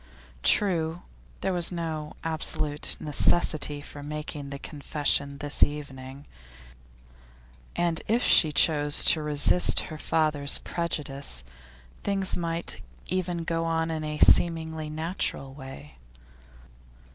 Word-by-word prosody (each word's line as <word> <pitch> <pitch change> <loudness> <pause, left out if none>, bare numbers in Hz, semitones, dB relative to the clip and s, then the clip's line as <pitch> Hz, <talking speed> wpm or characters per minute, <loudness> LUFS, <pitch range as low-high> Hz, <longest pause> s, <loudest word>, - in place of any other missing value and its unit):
True, 170 - +1 0.4
there 190 - -1
was 175 -1 +4
no 160 -3 -5
absolute 155 -2 -1
necessity 150 -1 +2
for 145 - -10
making 150 -1 -6
the 140 - -6
confession 140 -1 -2
this 145 +1 -2
evening, 140 -2 -2 1.5
and 170 -2 0
if 230 +3 +1
she 155 - +5
chose 145 -1 +3
to 160 - +3
resist 150 +3 +3
her 155 - -7
father's 150 -3 +1
prejudice, 140 - -3 0.6
things 195 -2 +4
might 170 -1 -3 0.3
even 180 -2 -2
go 165 0 -2
on 165 0 -1
in 160 -1 -4
a 150 0 -4
seemingly 160 -2 +3
natural 155 -4 -3
way. 75 - -11
155 Hz, 110 wpm, -26 LUFS, 145-165 Hz, 1.5 s, she